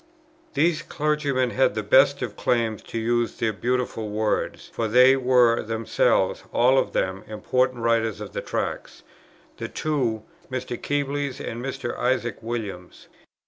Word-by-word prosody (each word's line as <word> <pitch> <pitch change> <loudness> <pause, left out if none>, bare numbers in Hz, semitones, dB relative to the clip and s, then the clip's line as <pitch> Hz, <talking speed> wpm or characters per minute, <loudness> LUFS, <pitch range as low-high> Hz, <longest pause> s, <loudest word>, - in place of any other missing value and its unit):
These 165 -1 +2
clergymen 145 -5 0
had 130 -5 +2
the 110 - -2
best 135 +6 +4
of 115 -4 -5
claims 115 -3 0
to - - -7
use 120 +1 0
these 110 - 0
beautiful 120 +1 -2
words, 105 +1 -2
for 115 - -1
they 125 +4 +6
were 125 -3 +4
themselves, 115 0 +1
all 130 +3 +4
of - - -2
them, 95 +2 -1
important 125 +3 0
writers 115 -2 +1
in - - -7
the - - -4
Tracts, - - -4 0.5
the - - -4
two 125 -8 -1 0.3
Mr. 130 -1 -4
Kebles, 145 0 -2
and 120 +2 -5
Mr. 130 -2 -4
Isaac 125 -2 0
Williams. 105 -6 -6
120 Hz, 140 wpm, -24 LUFS, 110-130 Hz, 0.5 s, they